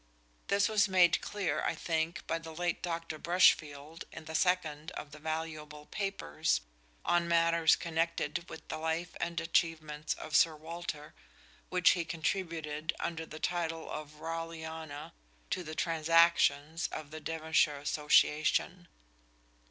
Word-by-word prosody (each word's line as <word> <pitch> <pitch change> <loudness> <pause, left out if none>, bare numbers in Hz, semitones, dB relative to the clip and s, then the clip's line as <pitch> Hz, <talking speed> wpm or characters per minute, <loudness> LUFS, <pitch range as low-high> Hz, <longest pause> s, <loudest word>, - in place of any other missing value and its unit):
This 200 +1 +3
was 215 -2 +3
made 175 -3 +5
clear, 180 -8 -2
I - - 0
think, 160 0 -2
by 165 +1 -1
the 165 -1 -9
late 175 0 -1
Dr. 165 -3 -4
Brushfield 155 -3 +2
in 160 - -9
the 160 - -7
second 160 -3 +1
of 145 - -7
the 150 - -11
valuable 155 -1 -5
papers 195 - -1 0.4
on 175 0 +2
matters 170 -1 +4
connected 170 +1 -2
with - - -10
the - - -4
life 160 +2 -2
and 170 0 -1
achievements 155 -2 0
of 155 - -5
Sir 165 -2 +5
Walter, 155 -1 -6 0.6
which 180 -1 +5
he 175 - 0
contributed 160 -2 -2
under 165 -1 -3
the 155 - -8
title 165 -2 -2
of 150 0 -6
"Raleghana" 160 -2 -6 0.4
to - - 0
the 155 -1 -7
"Transactions" 165 -1 +3
of 155 -1 -6
the 155 - -6
Devonshire 160 -1 +1
Association. 150 +4 +2
160 Hz, 135 wpm, -32 LUFS, 155-170 Hz, 0.6 s, made